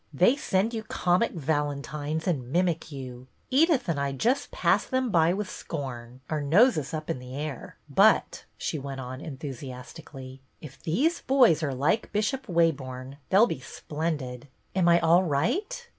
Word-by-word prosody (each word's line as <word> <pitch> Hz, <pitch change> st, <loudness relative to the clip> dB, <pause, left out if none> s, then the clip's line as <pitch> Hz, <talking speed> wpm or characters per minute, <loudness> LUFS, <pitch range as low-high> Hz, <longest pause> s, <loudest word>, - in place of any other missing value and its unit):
" -, -, -32 dB
They 245 Hz, -, +5 dB
send 225 Hz, -6 st, 0 dB
you 225 Hz, -, -2 dB
comic 180 Hz, 0 st, +1 dB
valentines 150 Hz, 0 st, -2 dB
and 130 Hz, -8 st, -1 dB
mimic 170 Hz, -1 st, 0 dB
you! 130 Hz, -2 st, -8 dB, 0.2 s
Edith 295 Hz, -, +3 dB
and 165 Hz, -4 st, 0 dB
I 140 Hz, 0 st, -1 dB
just 250 Hz, -, 0 dB
pass -, -, +2 dB
them 260 Hz, -3 st, 0 dB
by 165 Hz, -1 st, +4 dB
with 200 Hz, +2 st, -2 dB
scorn, 130 Hz, -8 st, -7 dB
our 155 Hz, -1 st, -2 dB
noses 160 Hz, -, +3 dB
up 155 Hz, -1 st, -4 dB
in -, -, -2 dB
the 125 Hz, +1 st, -9 dB
air. 145 Hz, -2 st, -6 dB
But," -, -, +3 dB
she 155 Hz, -, -3 dB
went 135 Hz, -1 st, -6 dB
on 130 Hz, +1 st, -6 dB
en 150 Hz, -5 st, -7 dB
thusiastically, 130 Hz, 0 st, -9 dB
" -, -, -43 dB
if 145 Hz, -4 st, -12 dB
these 280 Hz, -, +1 dB
boys 250 Hz, -, +4 dB
are 140 Hz, -4 st, -1 dB
like 150 Hz, -, 0 dB
Bishop 215 Hz, +6 st, -1 dB
Waborne 140 Hz, -7 st, -1 dB
they 190 Hz, -, +4 dB
'll 220 Hz, -, +8 dB
be 185 Hz, -, -4 dB
splendid. 145 Hz, -1 st, -4 dB, 0.3 s
Am 180 Hz, -2 st, +3 dB
I 170 Hz, 0 st, +6 dB
all 170 Hz, +2 st, +5 dB
right 360 Hz, -, -1 dB
155 Hz, 175 wpm, -27 LUFS, 135-195 Hz, 0.3 s, ll